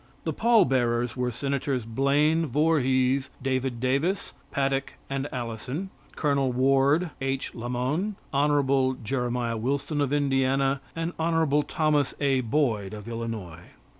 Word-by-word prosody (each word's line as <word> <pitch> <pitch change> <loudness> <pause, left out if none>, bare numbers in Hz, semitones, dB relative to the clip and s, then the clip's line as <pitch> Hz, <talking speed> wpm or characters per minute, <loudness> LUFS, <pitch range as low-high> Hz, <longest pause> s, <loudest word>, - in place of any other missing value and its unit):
The - - -2
pall 230 0 +4
bearers 120 -2 +1
were 125 -1 0
Senators 135 0 -2
Blaine, 145 +7 +2
Vorhees, 135 -2 +2
David 130 -2 -1
Davis, 140 - 0 0.2
Paddock 135 -1 -1 0.2
and 135 +1 -1
Allison, 125 - -4 0.2
Col. 140 -3 +1
Ward, 135 +6 +3
H. 135 0 -2
Lamon, 125 - -2 0.2
Hon. 140 -2 +2
Jeremiah 120 -1 -1
Wilson 140 +5 -1
of 140 -2 0
Indiana, 135 -1 +1
and 165 +1 -2
Hon. 160 -3 +2
Thomas 150 -3 +1
A. 135 -2 +2
Boyd 115 -6 0
of 105 0 -9
Illinois. 115 -8 -5
135 Hz, 120 wpm, -26 LUFS, 125-145 Hz, 0.2 s, pall